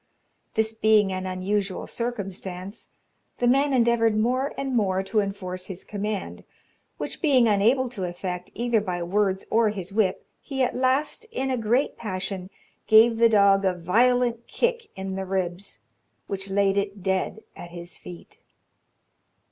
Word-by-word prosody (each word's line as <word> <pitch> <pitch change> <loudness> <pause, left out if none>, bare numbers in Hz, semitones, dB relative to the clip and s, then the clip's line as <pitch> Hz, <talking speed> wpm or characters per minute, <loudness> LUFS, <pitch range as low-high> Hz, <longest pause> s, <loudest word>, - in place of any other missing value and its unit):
This 220 0 +1
being 215 -3 +3
an 185 0 -3
unusual 190 +1 -2
circumstance, 195 -4 -5 0.5
the 245 - 0
man 275 +3 +3
endeavoured 235 -3 +3
more 255 +5 +1
and 270 -2 -2
more 190 -4 +1
to 215 +3 0
enforce 190 -2 -4
his 190 -2 -7
command; 205 -1 -4 0.5
which - - -5
being 265 -7 +4
unable 225 +6 +3
to 205 -6 -4
effect, 180 0 -5
either 235 -1 +1
by 180 -3 -3
words 190 +1 0
or 225 -1 +4
his 195 -2 -6
whip, 200 -3 +1 0.2
he 270 -2 -2
at - - 0
last, 270 - 0
in 270 - -2
a - - +1
great 240 +4 0
passion, 190 -3 -4 0.4
gave 225 +1 +6
the 230 0 +5
dog 200 -2 +5
a 185 -2 +1
violent 235 +6 +2
kick 475 -2 -1
in 190 0 -5
the 190 0 -3
ribs, 190 0 -3 0.5
which 195 0 -5
laid 195 0 +2
it 200 -1 -2
dead 190 +3 -1
at 175 - -9
his 170 0 -9
feet. 420 - -12
205 Hz, 150 wpm, -25 LUFS, 190-235 Hz, 0.5 s, gave